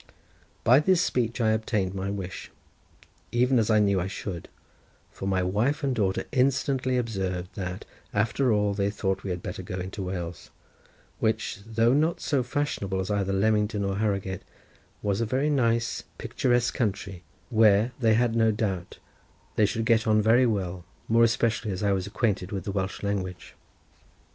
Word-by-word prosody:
By 125 +4 +6
this 185 +3 +3
speech 120 -2 -1
I 110 -2 +3
obtained 110 -4 0
my 95 0 -3
wish, 95 -2 -5 0.8
even 125 +1 +3
as 110 - +1
I 110 - +5
knew 100 -3 +3
I 90 - -2
should, 95 -2 -6 0.6
for 95 - -6
my 95 -1 +1
wife 115 - 0
and 135 -2 +1
daughter 100 -5 0
instantly 130 -1 +1
observed, 95 -6 -2
that, 90 -1 -5 0.3
after 115 +5 +1
all, 105 -1 +2
they 100 0 0
thought 95 -2 -2
we 100 - -5
had 90 -1 -4
better - - -5
go 90 0 -6
into 95 +3 -5
Wales, 90 -2 -5 0.7
which, 110 -2 -1
though 115 +2 +3
not 155 +4 +2
so 140 -3 0
fashionable 120 -7 -2
as 95 +2 -2
either 100 -1 0
Leamington 105 +1 +1
or 100 0 -1
Harrowgate, 100 -3 -1 0.6
was 100 +1 0
a - - +1
very 135 +6 +1
nice 115 -4 +1 0.2
picturesque 120 -2 0
country, 100 -5 -2 0.3
where, 110 0 +5
they 110 -3 +4
had 120 0 +2
no 115 -1 +4
doubt, 100 -5 -2 0.6
they 105 - +4
should 115 +1 -2
get 115 0 +3
on 110 0 +4
very 115 +4 +4
well, 95 -5 -2 0.2
more 115 +1 +4
especially 115 -2 +1
as 95 0 -3
I 100 - +2
was 95 -1 -1
acquainted 100 -3 -1
with 95 -4 -3
the 100 - -3
Welsh 95 0 -3
language. 95 -4 -3
105 Hz, 170 wpm, -27 LUFS, 95-115 Hz, 0.8 s, By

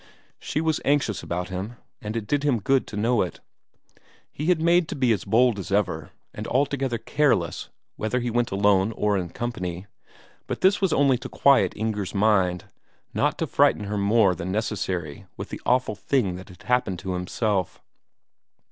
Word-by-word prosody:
She 155 - -2
was 160 -2 0
anxious 140 -8 +1
about 90 +1 -4
him 95 +6 -5 0.3
and 110 +1 -4
it 110 - -3
did 145 +6 0
him 140 -5 +1
good 135 +2 +1
to 105 - -7
know 115 +2 +2
it. 90 - -3 0.9
He 150 - -4
made 170 +2 +3
out - - -29
to - - -5
be 130 -4 +2
as 105 - 0
bold 115 +1 +3
as 95 - -7
ever, 90 -7 0 0.2
and 105 - -6
altogether 135 -2 0
careless 115 - 0 0.3
whether 110 +4 -1
he 120 -1 -2
went 120 0 +1
alone 100 +1 +2
or 105 -1 +1
in 90 -3 -2
company; 90 -4 -4 0.6
but - - -4
this 195 +2 +4
was 190 -3 +2
only 135 -3 +3
to - - -7
quiet 140 -1 +4
Inger's 105 -3 -3
mind, 95 -4 +2 0.5
not - - +1
to - - -1
frighten - - +3
her 105 +1 -3
more 100 -1 +4
than 90 +2 -5
necessary 95 -7 -3
with - - -6
the - - -7
awful 125 -1 +2
thing 105 0 0
that 95 +1 -10
had 90 - -15
happened 125 -7 +1
to 95 +1 -4
himself. 95 +1 -1
105 Hz, 180 wpm, -25 LUFS, 95-125 Hz, 0.9 s, this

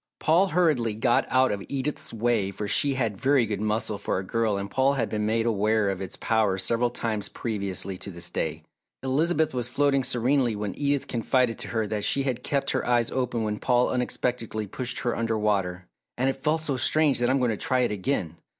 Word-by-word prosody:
Paul 170 +5 +3
hurriedly 155 - +1
got 120 +2 +2
out 130 0 +3
of 100 -1 -3
Edith's 140 +1 -3
way 115 -3 0
for 100 +1 -5
she 140 +7 +3
had 115 -6 -2
very 135 -3 +3
good 105 -2 -3
muscle 110 -1 -1
for - - -1
a 95 - -3
girl 110 +1 0
and 100 0 -5
Paul 135 +1 +3
had 120 -5 -1
been 105 -1 -1
made 115 +1 +1
aware 110 -2 +2
of 95 - -5
its 95 - -5
power 110 -4 +1
several 115 +6 +2
times 110 -3 -2
previously 100 -4 -3
to - - -8
this 85 -2 -5
day. - - -3 0.4
Elizabeth 155 +4 +1
was 125 -2 -2
floating 140 +2 +2
serenely 125 -1 +1
when 105 -1 -3
Edith 145 -1 0
confided 120 0 +1
to - - -6
her 110 -2 -1
that 105 0 -3
she 140 +6 +2
had 125 -3 -2
kept 140 +1 -1
her 130 - -1
eyes 120 -1 +1
open 125 -3 -1
when 105 -1 -2
Paul 125 -1 +2
unexpectedly 120 -3 -2
pushed 120 +5 -2
her 120 - -1
under 115 -1 -1
water. 95 -4 -1 0.3
"And 130 +2 +1
it 135 - +2
felt 150 +4 -1
so 145 -4 -2
strange 150 +2 +2
that 120 0 +2
I'm 135 - +3
going 125 -3 +1
to - - -1
try 130 +4 +1
it 120 - +1
again." 95 - -2
120 Hz, 215 wpm, -26 LUFS, 105-130 Hz, 0.4 s, Paul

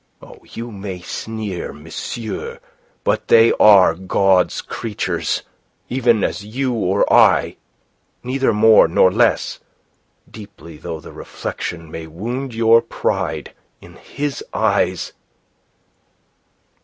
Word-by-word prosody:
Oh, - - -14
you 115 +1 -7
may 95 -3 -7
sneer, 105 -1 -5
monsieur, 115 - -6 0.4
but - - -1
they 115 0 +6
are 100 -3 +7
God's 95 0 +1
creatures, 110 -3 -3 0.5
even 120 -4 +2
as 100 - -2
you 125 +5 -2
or 100 -3 +1
I - - +4 0.7
neither 130 0 0
more 110 -2 +6
nor 90 +3 +4
less, 115 +3 +1 0.7
deeply 100 -7 -12
though 80 0 -7
the - - -12
reflection 80 -2 -6
may 80 0 -7
wound 120 - -5
your 115 0 +5
pride. - - -3 0.3
In - - -15
His 145 -1 -5
eyes..." - - 0
110 Hz, 105 wpm, -19 LUFS, 95-120 Hz, 0.7 s, are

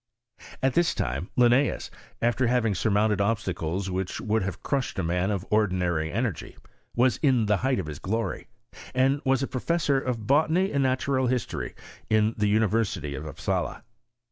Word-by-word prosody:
At 135 -1 +3
this 175 -1 +2
time 70 +9 -2
lionEeus, 125 +3 +3 0.3
after 120 +1 +2
having 120 -3 +2
surmounted 105 +1 +1
obstacles 95 -4 -1
which 95 0 -3
would 110 +1 0
have 95 -1 -4
crushed 135 -3 -1
a 95 - 0
man 90 +3 0
of 100 -4 -2
or 105 0 +4
dinary 85 -4 -1
energy, 115 -3 -3 0.4
was 125 0 +3
in 130 -6 +3
the 105 -1 +2
height 130 +3 0
of 95 - -2
his 75 -2 -7
glory; 115 +4 -3 0.5
and 135 +2 +3
was 135 0 +2
professor 140 +1 0
of 120 -5 -3
botany 160 - +3
and 140 - +1
natural 130 0 +1
history 125 0 -2 0.3
in 110 0 +3
the 105 -1 +1
University 105 -8 +1
of 75 +3 -6
Upsala. 75 - -3
110 Hz, 160 wpm, -26 LUFS, 95-130 Hz, 0.5 s, or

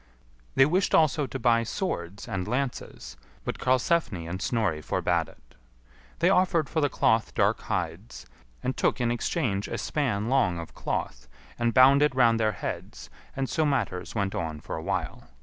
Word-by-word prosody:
They 135 - +7
wished 180 +6 +2
also 155 -2 +3
to 135 - -5
buy 115 -2 +3
swords 100 - -4
and 95 0 -3
lances, 125 +2 -4 0.3
but - - -4
Karlsefni 130 - +1
and 90 +3 -5
Snorri 105 -10 0
forbad - - 0
it. - - -22 0.6
They - - +3
offered 175 -5 +2
for 160 - -1
the 145 - +2
cloth 110 -3 +1
dark - - +2
hides, - - -4 0.4
and 130 - -1
took - - +1
in 120 -1 +1
exchange 120 - -1
a - - -4
span 120 -8 -1
long 115 -9 +2
of 85 -1 -8
cloth, - - -4 0.3
and 120 0 +2
bound 135 +3 +6
it 150 -3 +3
round 115 -3 +4
their 110 -1 +1
heads; - - -6 0.2
and 135 0 -1
so 160 - 0
matters 115 -12 -1
went 100 -2 -1
on 80 -2 -3
for - - -6
a 80 - -5
while. 95 -3 -3
120 Hz, 170 wpm, -27 LUFS, 95-140 Hz, 0.6 s, They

